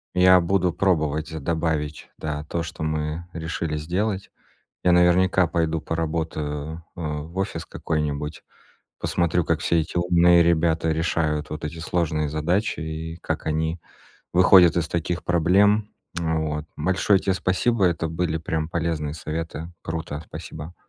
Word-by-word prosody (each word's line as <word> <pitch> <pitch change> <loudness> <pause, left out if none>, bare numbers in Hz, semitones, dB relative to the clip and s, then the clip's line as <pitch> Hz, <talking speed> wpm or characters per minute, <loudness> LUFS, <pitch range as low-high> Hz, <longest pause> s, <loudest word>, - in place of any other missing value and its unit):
Я 90 0 +7
буду 90 0 +1
пробовать 80 -5 0
добавить, 80 -2 -2
да, 75 -1 -4
то, 85 +2 -2
что 80 - -8
мы 80 +2 -2
решили 80 -1 -3
сделать. 95 +6 -2 0.5
Я 90 - +4
наверняка 90 +1 +4
пойду 80 -1 0
поработаю, 80 -1 -3
а, 75 -3 -3
в 80 +4 -12
офис 95 -4 -2
какой-нибудь, 75 -1 -3 0.6
посмотрю, 85 0 +1
как 80 0 0
все 85 -1 +2
эти 80 +2 -5
умные 85 0 +5
ребята 80 -1 +2
решают 80 -2 0
вот 75 +1 -5
эти 80 +2 -6
сложные 80 -3 -1
задачи 85 +8 0
и 80 +1 -5
как - - -3
они 80 +2 -1 0.5
выходят 90 -1 +7
из 85 -1 0
таких 85 +1 -2
проблем 100 +5 +3 0.3
вот. 80 -2 -1
Большое 95 +4 +2
тебе 95 - 0
спасибо, 95 +4 +1
это 85 -2 +1
были 80 0 -1
прям 80 0 -2
полезные 80 -3 -2
советы. 80 +1 -5
Круто, 80 -2 -4
спасибо. 80 +2 -8
80 Hz, 135 wpm, -24 LUFS, 80-90 Hz, 0.6 s, Я